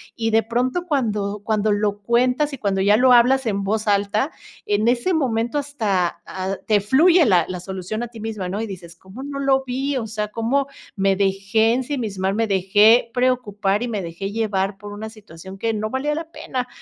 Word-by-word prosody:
y 225 -1 -1
de 225 +1 +3
pronto 250 +9 -1
cuando 210 - -1
cuando 215 -1 +1
lo 205 0 0
cuentas 250 +6 +1
y - - -5
cuando 195 -4 -1
ya 205 +2 +4
lo 250 +1 +5
hablas 255 +2 +4
en 200 -3 -1
voz 215 +2 -1
alta, 205 +7 +1 0.3
en 210 +2 +1
ese 245 +9 +2
momento 240 -4 0
hasta, 210 -12 -1
ah, 190 +1 -4
te 210 -2 +4
fluye, 320 - +5
la 180 -7 +4
la 185 -1 -5
solución 190 +4 -5
a - - -4
ti 230 -1 -12
misma, 210 -4 -4
¿no? 200 +4 -3
Y 225 - -3
dices: 175 -4 -9
"¿Cómo 190 +9 -11
no 280 0 -5
lo 270 -1 +2
vi? 265 +2 -2
O 230 -3 -3
sea, 210 -1 -3
¿cómo 245 +6 0 0.3
me 195 0 +2
dejé 200 +3 +1
ensimismar? 230 -8 -2
Me 225 +2 0
dejé 205 +5 +4
preocupar 220 -5 0
y - - -2
me 215 -4 -3
dejé 175 +3 -5
llevar 200 -3 -1
por 205 +1 -9
una 215 +1 -6
situación 190 -3 -12
que 225 +3 -1
no 215 0 -2
valía 275 +5 -1
la 325 +1 -6
pena", 260 -5 -4
220 Hz, 200 wpm, -21 LUFS, 200-250 Hz, 0.3 s, lo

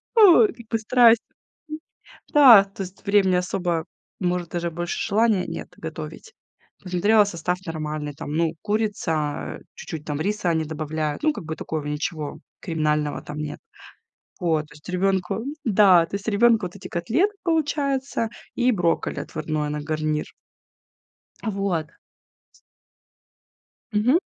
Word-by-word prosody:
Ох, 355 - +8
как 235 0 -11
бы 225 - 0
страсть. 235 0 +5 1.1
Да, 255 -9 +9
то 195 0 -7
есть 190 +2 -12
времени 200 -3 +4
особо, 175 -2 -1 0.3
может, 180 -2 -1
даже 175 0 -2
больше 175 +5 -3
желания 215 -2 +2
нет - - -6 0.2
готовить. 450 - -7 0.5
Посмотрела, 205 +4 +3
состав 180 -1 -2
нормальный, 155 -2 -4
там, 145 - -7
ну, 165 -1 +2
курица, 200 -9 -2 0.2
чуть-чуть 155 -2 -7
там 145 -1 -3
риса 205 -2 0
они 160 -1 +1
добавляют, 155 - -3
ну, 310 - +4
как 165 - -8
бы 160 - -4
такого 155 -2 -4
ничего 150 0 -4 0.2
криминального 150 -3 -1
там 150 0 -8
нет. 150 -1 -5 0.8
Вот, 160 -3 +1
то 150 - -16
есть 150 - -16
ребёнку 190 +2 0 0.2
да, 190 -6 +5
то - - -10
есть 200 - -7
ребёнку 225 +1 +4
вот 180 - -9
эти 200 - -9
котлеты 245 - +1
получается 280 -7 0 0.3
и 250 +1 +3
брокколи 175 -5 0
отварное 155 -1 -3
на 150 - -3
гарнир. 155 -1 -2 1.1
Вот. 195 -7 -1 2.0
Мгм. 245 +10 +3
180 Hz, 130 wpm, -24 LUFS, 155-220 Hz, 2.0 s, Да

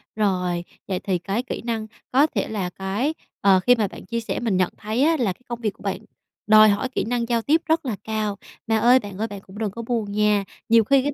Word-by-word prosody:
rồi, 180 -4 0 0.2
vậy 185 -2 -1
thì 190 -2 0
cái 200 +7 -2
kỹ 255 - -5
năng 225 -2 -2 0.2
có 275 +4 +5
thể - - -2
là 195 -5 -3
cái 195 - -2 0.3
ờ, 195 -1 +5
khi 245 +6 +5
mà 220 -4 0
bạn - - -11
chia 235 -1 -2
sẻ 225 - -3
mình 220 -6 0
nhận 185 -1 +2
thấy 220 +5 -1
á 320 +2 +3
là 215 -7 +1
cái - - -33
công 235 -1 -5
việc 215 -3 0
của - - -18
bạn 195 -2 -1 0.5
đòi 215 0 +8
hỏi 205 +6 0
kỹ 255 - -2
năng 235 0 -1
giao 235 -1 +2
tiếp 310 +7 +2
rất 320 -1 +1
là 240 -5 -1
cao. 215 -2 -2 0.3
Mà 225 0 +2
ơi 240 +4 +6
bạn 205 -5 -9
ơi, 220 +2 -1
bạn 200 -3 -8
cũng 195 0 -14
đừng 215 -2 -2
có 230 - -6
buồn 230 -3 -2
nha. 210 -1 +2 0.3
Nhiều 230 0 +6
khi 270 +4 +3
cái 290 +1 -1
220 Hz, 260 wpm, -23 LUFS, 200-240 Hz, 0.5 s, đòi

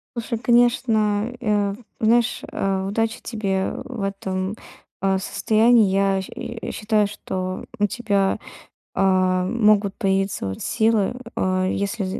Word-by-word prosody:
Слушай, 235 -1 -3
конечно, 230 -2 +2
э, 205 -4 0 0.2
знаешь, 235 +2 +2
э, 195 -1 -1
удачи 225 +2 -1
тебе 195 -4 -2
в 250 -5 -6
этом, 195 0 -3 0.5
э, 195 0 +2
состоянии. 220 +3 +3
Я, 195 0 +2
щ - - -10
э, 235 -1 -6
считаю, 210 -1 +1
что 185 -2 -5
у 205 - +4
тебя, 200 -3 0 0.6
э, - - 0
могут 195 +2 +3
появиться, 195 - 0
вот, 95 - -5
силы, 220 -2 +1 0.2
э, 185 0 +1
если, 200 +1 -2
205 Hz, 125 wpm, -22 LUFS, 195-225 Hz, 0.6 s, у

